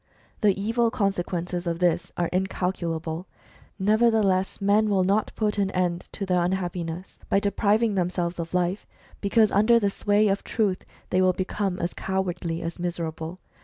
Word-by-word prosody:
The 200 -2 +3
evil 230 +3 +1
consequences 180 -3 -2
of 170 -1 -1
this 175 -1 +1
are 175 - +1
incalculable. 175 -3 -2 0.5
Nevertheless, 210 -2 +2
men 205 +2 +3
will 195 -2 +3
not 200 +3 +1
put 210 -1 0
an 195 -1 +2
end 180 -1 -1
to 200 - -3
their 180 -2 +2
unhappiness 175 -1 -3
by 195 - +4
depriving 210 +2 +2
themselves 175 -2 -1
of 165 +1 -4
life, 180 +2 0 0.3
because 215 +1 +3
under 215 +4 +5
the 200 -3 +1
sway 205 +1 +2
of 195 0 0
Truth 205 -5 -1 0.3
they 185 - +3
will 185 0 +4
become 190 0 -2
as 170 0 -2
cowardly 175 -3 -2
as 170 +1 -5
miserable. 170 -1 -4
185 Hz, 155 wpm, -25 LUFS, 175-205 Hz, 0.5 s, under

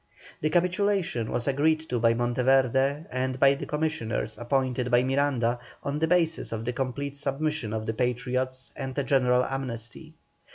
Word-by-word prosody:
The 155 - +1
capitulation 180 - +1
was 120 - -2
agreed 155 +3 +2
to 120 - 0
by 115 0 +4
Monteverde, 130 +4 +2
and 130 0 -2
by 140 0 +6
the 140 - -6
commissioners 150 -8 -2
appointed 125 0 0
by 120 0 +4
Miranda, 130 -3 +1 0.2
on 140 +1 -2
the 160 - +2
basis 165 -1 +1
of 115 0 -4
the 125 - -1
complete 135 +2 -3
submission 145 -3 -2
of 110 0 -3
the 110 - -1
Patriots 125 +2 -2
and 135 -1 -5
a 140 - +1
general 125 -2 +3
amnesty. 135 +4 -5
130 Hz, 160 wpm, -27 LUFS, 120-145 Hz, 0.2 s, by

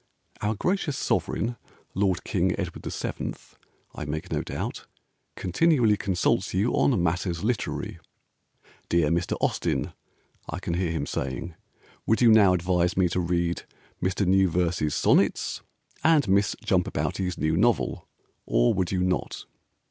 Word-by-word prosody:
Our 105 +1 0
Gracious 175 - -1
Sovereign 120 +2 -1 0.4
Lord 95 -2 0
King - - 0
Edward - - -5
VII. - - -4 0.6
(I 75 - -6
make 75 +2 -5
no - - 0
doubt) - - -5 0.5
Continually 120 - +3
consults 95 -1 0
you 105 +6 +1
on 110 -11 +2
matters 90 +1 -1
literary 120 +1 -2 0.9
"Dear 85 -3 +3
Mr. 85 +1 0
Austen" - - -1 0.6
(I - - -3
can - - -3
hear 90 0 0
him 80 -3 -2
saying), 70 +6 -4 0.5
"Would 110 - +3
you 120 -2 +6
now 100 -4 +6
advise 90 0 +1
me 90 -2 +3
to 90 - -1
read 85 -1 0 0.4
Mr. 95 +2 0
Newverse's 90 -4 +2
Sonnets - - +2 0.4
And 155 -6 +4
Miss 100 +2 +2
Jumpabouti's 90 -2 0
new 80 +1 +1
novel, 115 +7 +1 0.4
Or - - +3
would 90 -2 -1
you 90 -1 +1
not?" 90 0 -2
90 Hz, 135 wpm, -26 LUFS, 85-105 Hz, 0.9 s, you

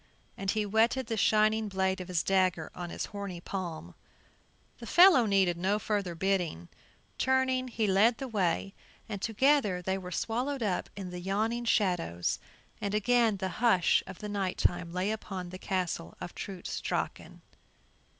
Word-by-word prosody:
And 195 - -4
he 215 +1 +1
whetted 225 +5 +2
the 225 0 -2
shining 215 +1 +3
blade 190 -1 0
of 180 - -7
his 180 -3 0
dagger 185 -4 +1
on 175 -1 -6
his - - -4
horny 200 -3 -5
palm. 170 - -5 0.9
The 235 - -9
fellow 345 - +7
needed 190 -4 +3
no 190 +4 +1
further 205 -5 -2
bidding; 175 - -1 0.5
turning, 260 -1 +2
he 225 -3 -1
led 210 +4 +4
the 270 - -5
way, 195 -3 0 0.3
and 205 -4 -5
together 230 -4 +2
they 190 +2 -2
were 180 -1 -7
swallowed 245 +7 -2
up 190 -4 -1
in 190 -3 -6
the 180 - -6
yawning 215 +6 -1
shadows, 175 - +1 0.4
and 200 0 -1
again 225 0 +3
the 190 0 -2
hush 190 -8 +4
of 195 - -10
night 200 -3 -2
time 175 -1 0
lay 185 +4 -1
upon 190 -4 -5
the 185 +1 -8
Castle 180 -4 -3
of 175 - -7
Trutz 190 -3 -6
Drachen. - - -4
195 Hz, 160 wpm, -30 LUFS, 180-220 Hz, 0.9 s, fellow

